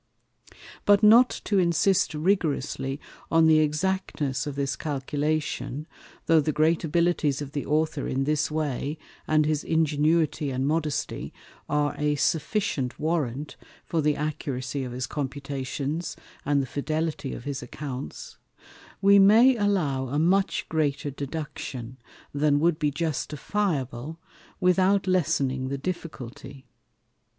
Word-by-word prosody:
But 205 Hz, +1 st, +4 dB
not 235 Hz, +4 st, +8 dB, 0.2 s
to 200 Hz, -2 st, +2 dB
insist 175 Hz, 0 st, +2 dB
rigorously 150 Hz, -5 st, 0 dB, 0.3 s
on 165 Hz, 0 st, +4 dB
the 160 Hz, -1 st, +6 dB
Exactness 155 Hz, -3 st, -1 dB
of 145 Hz, -, -4 dB
this 140 Hz, -1 st, -1 dB
Calculation, 145 Hz, -1 st, -2 dB, 0.4 s
(though 165 Hz, -1 st, +5 dB
the 155 Hz, +1 st, +1 dB
great 155 Hz, +3 st, +2 dB
Abilities 165 Hz, -3 st, +1 dB
of 145 Hz, -2 st, -6 dB
the 145 Hz, -1 st, -4 dB
Author 155 Hz, -1 st, 0 dB
in 135 Hz, +1 st, 0 dB
this 150 Hz, +1 st, +1 dB
way, 150 Hz, -1 st, -2 dB, 0.3 s
and 155 Hz, -1 st, +3 dB
his 155 Hz, -1 st, 0 dB
Ingenuity 155 Hz, -1 st, +1 dB
and 130 Hz, 0 st, -1 dB
Modesty, 155 Hz, -1 st, -2 dB, 0.4 s
are 145 Hz, 0 st, +1 dB
a 150 Hz, 0 st, +1 dB
sufficient 155 Hz, -, 0 dB
Warrant 150 Hz, -3 st, -2 dB, 0.3 s
for 165 Hz, -, 0 dB
the 150 Hz, 0 st, +2 dB
Accuracy 140 Hz, -3 st, -3 dB
of 125 Hz, -, -5 dB
his 125 Hz, +1 st, -3 dB
Computations, 140 Hz, +2 st, -4 dB, 0.3 s
and 145 Hz, -1 st, +2 dB
the -, -, -3 dB
Fidelity 155 Hz, +1 st, -3 dB
of -, -, -9 dB
his 140 Hz, 0 st, -4 dB
Accounts) 135 Hz, -3 st, -7 dB, 0.6 s
we 200 Hz, 0 st, +7 dB
may 225 Hz, +7 st, +7 dB
allow 175 Hz, -, 0 dB
a 140 Hz, +4 st, -2 dB
much 190 Hz, +5 st, +2 dB
greater 145 Hz, -2 st, -1 dB
Deduction, 135 Hz, -4 st, -6 dB, 0.4 s
than 145 Hz, 0 st, +2 dB
would 165 Hz, 0 st, +2 dB
be 150 Hz, -2 st, +2 dB
justifiable, 150 Hz, -, -2 dB, 0.4 s
without 190 Hz, +1 st, +3 dB
lessening 135 Hz, -8 st, +1 dB
the 140 Hz, +1 st, -3 dB
Difficulty. 140 Hz, -5 st, -7 dB
150 Hz, 125 wpm, -26 LUFS, 140-165 Hz, 0.6 s, not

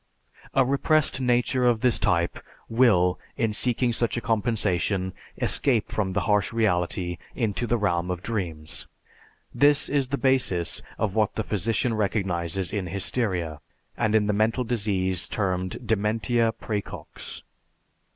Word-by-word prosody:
A 135 Hz, -, +5 dB
repressed 140 Hz, +1 st, +2 dB
nature 125 Hz, 0 st, +2 dB
of 120 Hz, -3 st, +3 dB
this 125 Hz, -2 st, +2 dB
type 85 Hz, -1 st, +1 dB, 0.3 s
will, 105 Hz, -7 st, +3 dB, 0.2 s
in 115 Hz, -2 st, 0 dB
seeking 120 Hz, +2 st, +1 dB
such 120 Hz, +1 st, 0 dB
a -, -, +1 dB
compensation, 100 Hz, -5 st, 0 dB, 0.3 s
escape 120 Hz, -7 st, +1 dB
from 95 Hz, -3 st, -1 dB
the -, -, +1 dB
harsh 105 Hz, -2 st, +1 dB
reality 90 Hz, -5 st, 0 dB, 0.2 s
into 115 Hz, 0 st, -1 dB
the 120 Hz, +2 st, +2 dB
realm 90 Hz, -4 st, 0 dB
of 90 Hz, 0 st, -3 dB
dreams. 85 Hz, -9 st, -3 dB, 0.7 s
This 145 Hz, 0 st, +4 dB
is 140 Hz, -2 st, +1 dB
the 140 Hz, -, -2 dB
basis 130 Hz, -11 st, +1 dB, 0.2 s
of 105 Hz, -3 st, -1 dB
what 110 Hz, -1 st, +1 dB
the 110 Hz, -, -1 dB
physician 110 Hz, +4 st, 0 dB
recognizes 95 Hz, -4 st, -1 dB
in 100 Hz, -4 st, -2 dB
hysteria, 90 Hz, -4 st, -1 dB, 0.3 s
and 110 Hz, 0 st, +1 dB
in 105 Hz, -1 st, +4 dB
the 105 Hz, -, +1 dB
mental 110 Hz, +4 st, +1 dB
disease 100 Hz, -6 st, 0 dB
termed 95 Hz, +2 st, -2 dB
"Dementia 115 Hz, +2 st, +1 dB
Præcox." 105 Hz, -2 st, -6 dB
105 Hz, 135 wpm, -25 LUFS, 95-120 Hz, 0.7 s, A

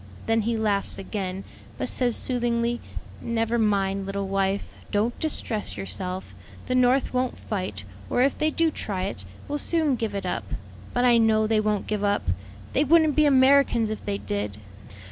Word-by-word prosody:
Then 225 Hz, 0 st, +2 dB
he 230 Hz, +1 st, 0 dB
laughs 205 Hz, -2 st, 0 dB
again, 195 Hz, -1 st, -4 dB, 0.3 s
but -, -, -2 dB
says 245 Hz, -2 st, +2 dB
soothingly, 240 Hz, -1 st, 0 dB, 0.4 s
'Never 230 Hz, 0 st, 0 dB
mind, 195 Hz, -2 st, +1 dB
little 195 Hz, 0 st, -2 dB
wife; 195 Hz, 0 st, -1 dB, 0.2 s
don't 220 Hz, +3 st, 0 dB
distress 230 Hz, -, -2 dB
yourself; 100 Hz, -, -4 dB, 0.3 s
the 255 Hz, -, -1 dB
North 255 Hz, +1 st, +3 dB
won't 255 Hz, 0 st, 0 dB
fight; 185 Hz, -, -4 dB, 0.3 s
or 250 Hz, -, +3 dB
if 275 Hz, -, +2 dB
they 310 Hz, -, +1 dB
do 325 Hz, +1 st, +1 dB
try 195 Hz, -9 st, -3 dB
it, 95 Hz, -, -4 dB, 0.2 s
will 295 Hz, 0 st, -1 dB
soon 315 Hz, -2 st, +2 dB
give 225 Hz, -3 st, -3 dB
it 195 Hz, -1 st, -3 dB
up,' 115 Hz, -, -3 dB, 0.4 s
But 245 Hz, -, +1 dB
I 240 Hz, -1 st, +6 dB
know 220 Hz, -1 st, +4 dB
they 215 Hz, 0 st, +2 dB
won't 210 Hz, -1 st, 0 dB
give 210 Hz, -1 st, -2 dB
up: 205 Hz, 0 st, +1 dB, 0.5 s
they 280 Hz, -, +3 dB
wouldn't 310 Hz, -1 st, +4 dB
be 305 Hz, -, +5 dB
Americans 265 Hz, -4 st, +4 dB
if 215 Hz, -, -5 dB
they 200 Hz, -1 st, -2 dB
did. 100 Hz, -, -3 dB
220 Hz, 170 wpm, -25 LUFS, 195-250 Hz, 0.5 s, I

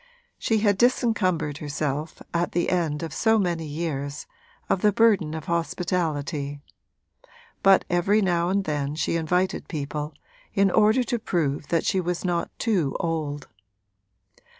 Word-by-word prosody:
She 220 Hz, -2 st, +1 dB
had 205 Hz, -3 st, +2 dB
disencumbered 185 Hz, -, +1 dB
herself, 150 Hz, +1 st, -3 dB
at 170 Hz, +1 st, 0 dB
the 175 Hz, -, +1 dB
end 165 Hz, -4 st, 0 dB
of 165 Hz, -, -5 dB
so 225 Hz, 0 st, +3 dB
many 170 Hz, -5 st, -1 dB
years, 145 Hz, -2 st, -4 dB, 0.4 s
of 185 Hz, -, +1 dB
the 210 Hz, -, +4 dB
burden 200 Hz, -8 st, +3 dB
of 160 Hz, -2 st, -6 dB
hospitality; 160 Hz, -4 st, -2 dB, 1.0 s
but 195 Hz, 0 st, +5 dB
every 180 Hz, +4 st, +2 dB
now 175 Hz, -3 st, +1 dB
and 195 Hz, +1 st, +1 dB
then 145 Hz, -3 st, -2 dB
she 160 Hz, -, -1 dB
invited 180 Hz, +3 st, 0 dB
people, 150 Hz, -1 st, -4 dB, 0.4 s
in 195 Hz, -2 st, +4 dB
order 220 Hz, +5 st, +4 dB
to 240 Hz, 0 st, -2 dB
prove 150 Hz, -8 st, -1 dB
that 165 Hz, -2 st, 0 dB
she 190 Hz, -, +2 dB
was 175 Hz, +1 st, -3 dB
not 175 Hz, -1 st, 0 dB
too 180 Hz, -, 0 dB
old. 155 Hz, -4 st, -2 dB
170 Hz, 140 wpm, -25 LUFS, 150-195 Hz, 1.0 s, but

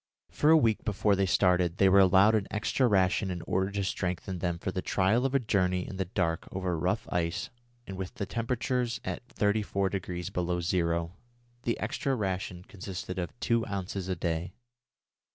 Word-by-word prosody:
For 150 Hz, -, +2 dB
a 160 Hz, -, +8 dB
week 115 Hz, -8 st, +2 dB
before 105 Hz, -1 st, +2 dB
they 95 Hz, 0 st, +1 dB
started 90 Hz, -1 st, +2 dB
they 95 Hz, -, +5 dB
were 95 Hz, +1 st, +6 dB
allowed 95 Hz, +3 st, +6 dB
an 105 Hz, -3 st, +1 dB
extra 110 Hz, +4 st, +1 dB
ration 95 Hz, -1 st, +2 dB
in 90 Hz, -2 st, -4 dB
order 95 Hz, +3 st, 0 dB
to 100 Hz, 0 st, -2 dB
strengthen 90 Hz, 0 st, -3 dB
them 85 Hz, 0 st, -1 dB
for 95 Hz, -, -3 dB
the 95 Hz, -, -3 dB
trial 105 Hz, +9 st, +2 dB
of 135 Hz, -, -3 dB
a -, -, +5 dB
journey 90 Hz, -6 st, 0 dB
in 95 Hz, -, -7 dB
the 95 Hz, -, -1 dB
dark 85 Hz, -2 st, -1 dB
over 95 Hz, -2 st, -2 dB
rough 80 Hz, -, -1 dB
ice 85 Hz, -1 st, -1 dB, 0.3 s
and 95 Hz, -, -7 dB
with 95 Hz, -1 st, -5 dB
the 100 Hz, -, -3 dB
temperature 125 Hz, +4 st, -1 dB, 0.2 s
at 120 Hz, -, -5 dB
34° 100 Hz, -5 st, -1 dB
below 90 Hz, 0 st, 0 dB
zero. 85 Hz, -1 st, 0 dB, 0.5 s
The 115 Hz, -, 0 dB
extra 130 Hz, +5 st, -1 dB
ration 95 Hz, -4 st, -3 dB
consisted 95 Hz, -1 st, -6 dB
of 90 Hz, +6 st, -5 dB
two 115 Hz, -1 st, +1 dB
ounces 95 Hz, -1 st, -4 dB
a 95 Hz, -, 0 dB
day. 85 Hz, +1 st, -2 dB
95 Hz, 180 wpm, -29 LUFS, 90-105 Hz, 0.5 s, a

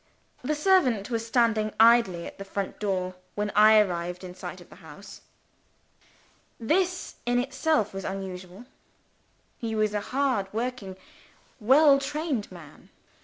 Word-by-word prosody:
The 300 Hz, +4 st, -1 dB
servant 280 Hz, -, +2 dB
was 230 Hz, -1 st, -2 dB
standing 225 Hz, -3 st, +1 dB
idling 225 Hz, -7 st, +4 dB
at -, -, -10 dB
the -, -, -5 dB
front 195 Hz, 0 st, -5 dB
door, 185 Hz, -3 st, -2 dB, 0.2 s
when 210 Hz, 0 st, -2 dB
I 215 Hz, +1 st, +6 dB
arrived 180 Hz, -3 st, 0 dB
in 180 Hz, -1 st, -8 dB
sight -, -, -8 dB
of -, -, -17 dB
the -, -, -14 dB
house. -, -, -13 dB, 1.4 s
This, 360 Hz, +9 st, -1 dB
in 245 Hz, 0 st, +2 dB
itself, 260 Hz, -3 st, 0 dB
was 195 Hz, 0 st, -6 dB
unusual. 190 Hz, +2 st, -7 dB, 0.9 s
He 225 Hz, -2 st, -3 dB
was 215 Hz, -1 st, 0 dB
a 210 Hz, -, -1 dB
hard 250 Hz, -6 st, -1 dB
working 225 Hz, -4 st, -4 dB, 0.6 s
well 275 Hz, +5 st, +5 dB
trained 280 Hz, -, -3 dB
man. 170 Hz, -5 st, -14 dB
220 Hz, 135 wpm, -26 LUFS, 195-255 Hz, 1.4 s, I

